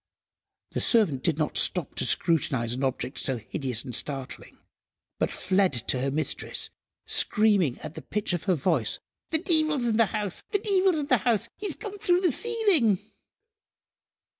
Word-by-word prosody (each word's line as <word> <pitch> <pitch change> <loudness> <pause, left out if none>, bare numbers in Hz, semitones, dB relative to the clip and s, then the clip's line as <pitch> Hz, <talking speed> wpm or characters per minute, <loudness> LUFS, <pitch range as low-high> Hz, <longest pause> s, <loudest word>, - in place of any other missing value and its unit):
The - - -2
servant 195 - +2
did 160 0 0
not 155 -1 0
stop 180 -7 +2
to 130 - +2
scrutinise 130 -9 +1
an 130 +3 -4
object 130 0 -2
so 130 -2 -1
hideous 120 +1 -2
and 125 - -7
startling, 135 -1 -4 0.6
but - - +1
fled 190 -3 +1 0.2
to 125 - +1
her 135 - 0
mistress, 155 +3 -2 0.3
screaming 205 - +2
at 155 -1 -7
the - - -8
pitch 210 -3 -2
of 175 - -3
her 185 -3 +2
voice— 140 - 0 0.3
"The 320 - +2
deevil's 310 -6 +2
in 225 -2 +1
the 230 -2 +4
house! 210 -4 -4
The - - +2
deevil's 385 -4 +2
in 295 - -1
the 255 -3 +3
house! 225 0 0
He's 410 +1 -3
come 410 -3 -8
through 355 -1 +2
the 360 -4 +2
ceiling!" 395 - +3
195 Hz, 165 wpm, -26 LUFS, -, 0.6 s, the